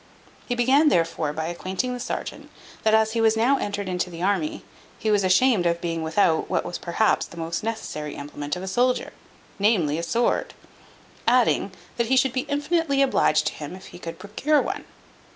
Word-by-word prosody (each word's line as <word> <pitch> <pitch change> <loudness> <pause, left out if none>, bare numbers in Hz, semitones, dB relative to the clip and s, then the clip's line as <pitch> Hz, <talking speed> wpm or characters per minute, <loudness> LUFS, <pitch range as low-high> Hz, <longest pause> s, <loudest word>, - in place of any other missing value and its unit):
He 245 - -1
began 270 +6 +4
therefore 165 - +1
by 160 +1 -3
acquainting 185 +8 -3
the 250 - -5
serjeant, - - -5 0.3
that 220 0 +4
as 220 0 +3
he 230 0 0
was 225 0 +3
now 255 +5 +3
entered 205 -1 -3
into 180 0 -1
the 170 0 -7
army, 190 -6 0 0.3
he 215 - -1
was 205 -1 +3
ashamed 185 0 +4
of 170 0 0
being 165 -1 -3
without 160 0 +1
what - - 0
was 175 - -5
perhaps 195 +5 +1
the 170 - -13
most 165 +2 -3
necessary 155 -9 -4
implement 145 +1 -5
of 180 - -6
a - - -5
soldier; 245 +6 +1 0.5
namely, 180 -8 +2
a - - -2
sword; 230 +9 0 0.7
adding, 240 -4 +3 0.3
that 235 -1 +1
he 265 +2 +3
should 260 -1 +3
be 260 -1 -2
infinitely 290 -1 +1
obliged 255 - +2
to - - -1
him, 150 +4 -7
if 190 - -12
he - - -10
could 165 -2 -7
procure 275 +9 +1
one. - - -3
205 Hz, 190 wpm, -24 LUFS, 170-245 Hz, 0.7 s, began